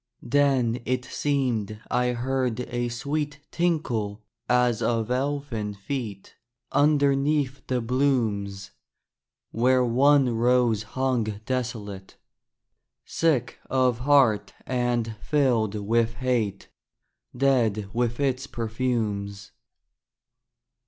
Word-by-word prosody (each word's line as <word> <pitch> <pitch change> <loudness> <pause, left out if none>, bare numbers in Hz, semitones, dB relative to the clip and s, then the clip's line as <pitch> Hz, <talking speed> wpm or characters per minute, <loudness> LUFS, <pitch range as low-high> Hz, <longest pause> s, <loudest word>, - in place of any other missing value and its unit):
Then 130 -3 +2
it 125 0 -1
seemed 125 -7 -1
I 125 0 +2
heard 125 -1 -1
a 120 0 -2
sweet 145 +4 -3
Tinkle 120 -12 -1 0.3
as 125 -2 +3
of 115 -1 0
elfin 130 -6 -2
feet 105 -2 -5 0.4
Underneath 140 -1 +2
the 125 -1 0
blooms, 110 -6 0 0.8
Where 125 +2 +3
one 135 +3 +4
rose 120 -2 +3 0.2
hung 130 -4 +1 0.2
desolate, 110 -7 -4 0.9
Sick 135 -7 0
of 130 -3 +2
heart 125 -7 +3
and 120 -3 -1
filled 120 -8 +1
with 115 +2 +1
hate, 115 -5 -1 0.7
Dead 120 -7 +2
with 120 +1 -1
its 135 -2 0
perfumes. 110 -4 -3
125 Hz, 90 wpm, -25 LUFS, 110-135 Hz, 0.9 s, one